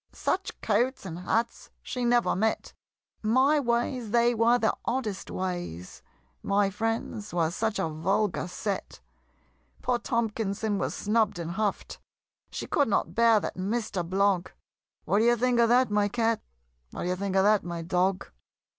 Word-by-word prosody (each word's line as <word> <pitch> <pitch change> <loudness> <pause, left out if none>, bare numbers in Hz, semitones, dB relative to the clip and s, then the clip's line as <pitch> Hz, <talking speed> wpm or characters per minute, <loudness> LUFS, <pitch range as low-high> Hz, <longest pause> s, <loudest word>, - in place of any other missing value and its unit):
Such 380 +1 -2
coats 235 +3 0
and 170 -2 -6
hats 225 +6 -1
she 250 - -4
never 240 0 +3
met! 220 +4 -1 0.5
My 260 +7 +3
ways 240 -2 -1
they 235 +2 +3
were 235 +1 +4
the 220 -3 +1
oddest 230 -5 -3
ways! 175 - -5 0.4
My 200 0 +1
friends 220 -1 -3
were 165 -2 +1
such 220 +4 -1
a - - 0
vulgar 175 +4 -1
set! 195 - -4 0.8
Poor 245 -1 +1
Tomkinson 220 -3 -1
was - - -2
snubb'd 215 -2 +1
and 170 -1 -4
huff'd 205 +2 -2 0.5
She - - -5
could 285 - +1
not 210 - 0
bear 230 -1 +5
that - - -4
Mister 200 -1 -2
Blogg 190 +1 +1 0.6
What 200 - +2
d'ye 240 +2 +4
think 245 +1 +1
of 230 -1 +4
that, 245 -1 +4
my 205 0 +2
Cat? 225 +1 0 0.5
What - - -6
d'ye 180 - 0
think 195 +1 -3
of 190 - +4
that, 210 0 +4
My 170 -1 -5
Dog? 185 +2 0
215 Hz, 155 wpm, -27 LUFS, 190-235 Hz, 0.8 s, bear